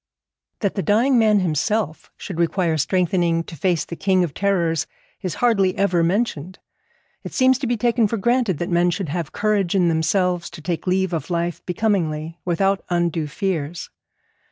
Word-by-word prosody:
That 200 -3 0
the 195 - -2
dying 235 +6 +3
man 215 -3 +4
himself 180 +2 -1
should 180 -4 -7
require 170 0 +1
strengthening 170 +1 +1
to 165 - -10
face 175 +2 0
the 170 - -7
King 185 0 +2
of 165 -5 -3
Terrors 170 -5 0 0.3
is 180 -3 -3
hardly 200 -6 +2
ever 185 -3 +2
mentioned. 185 -2 -1 0.7
It - - -8
seems 260 -1 +4
to 270 - -2
be 240 0 0
taken 235 0 +2
for 230 - -2
granted 235 - +1
that 175 +4 -3
men 175 +1 +3
should 175 -1 -3
have 170 +1 -3
courage 205 -4 0
in 180 -3 +3
themselves 170 +2 0
to 170 -2 -11
take 170 +1 -3
leave 185 0 +1
of 165 - -3
life 170 0 -2
becomingly, 170 -5 -1
without 195 +2 +1
undue 170 -3 0
fears. 170 -2 -3
180 Hz, 170 wpm, -21 LUFS, 170-200 Hz, 0.7 s, man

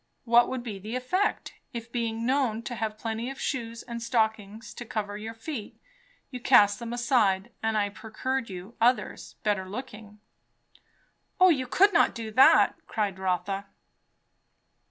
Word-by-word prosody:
What 240 0 +5
would 255 -2 -4
be 210 -5 -6
the 215 +5 -6
effect, 365 +11 -1 0.2
if, 230 -1 -7
being 230 -1 -2
known 250 -4 +1
to 245 - -5
have 220 -2 -3
plenty 225 +2 -3
of 270 0 -8
shoes 230 -4 -3
and 235 -1 -6
stockings 220 -2 -1
to - - -7
cover 210 -3 -4
your 220 +2 -7
feet, 225 -2 -7 0.5
you 250 - -5
cast 210 -5 +5
them 235 -1 -6
aside, 235 -4 +1
and 220 -1 0
I 205 -1 +1
procured 225 +4 -4
you 185 +4 -8
others, 245 +2 +1
better 195 -3 0
looking?" 210 -2 -8 1.2
"O 370 0 +8
you 265 -6 +1
could 400 +9 +4
not 340 - +4
do 225 -2 -5
that!" 260 +5 +6
cried 200 -3 -2
Rotha. 190 +1 -2
225 Hz, 155 wpm, -27 LUFS, 210-250 Hz, 1.2 s, O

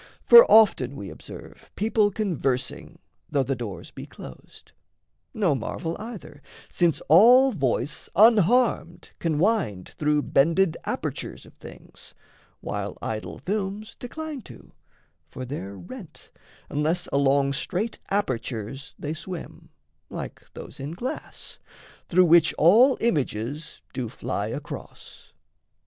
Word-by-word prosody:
For 475 +1 +9
often 165 - +5
we 100 -8 -7
observe - - -12
People 215 0 +2
conversing, 165 - -2 0.3
though 140 -2 +1
the 135 +1 -2
doors 115 -6 -7
be - - -9
closed; 65 - -13 0.6
No 195 -8 +1
marvel 160 +6 -4
either, 215 -9 -9 0.3
since 170 -3 +1
all 245 - +7
voice 135 - -2
unharmed 220 -3 +3
Can 160 -3 -1
wind 165 - 0
through 150 -1 +2
bended 165 +4 +2
apertures - - -4
of - - -17
things, - - -13 0.5
While - - -4
idol 110 -1 -5
films 205 +1 -3
decline 305 +2 -6
to - - -15 0.6
for 130 - -7
they're 100 -7 -6
rent, 90 -2 -11 0.4
Unless 160 +4 -1
along 140 0 +2
straight 190 +9 -3
apertures 130 - -3
they 150 +1 -4
swim, 170 +1 -8 0.4
Like - - -7
those 140 - -10
in 140 +4 -5
glass, 240 +9 -7 0.5
through 185 +1 +5
which 165 -1 +5
all 230 - +6
images 145 - -2
Do 125 -3 -3
fly - - -4
across. - - -9
165 Hz, 115 wpm, -25 LUFS, 135-210 Hz, 0.6 s, For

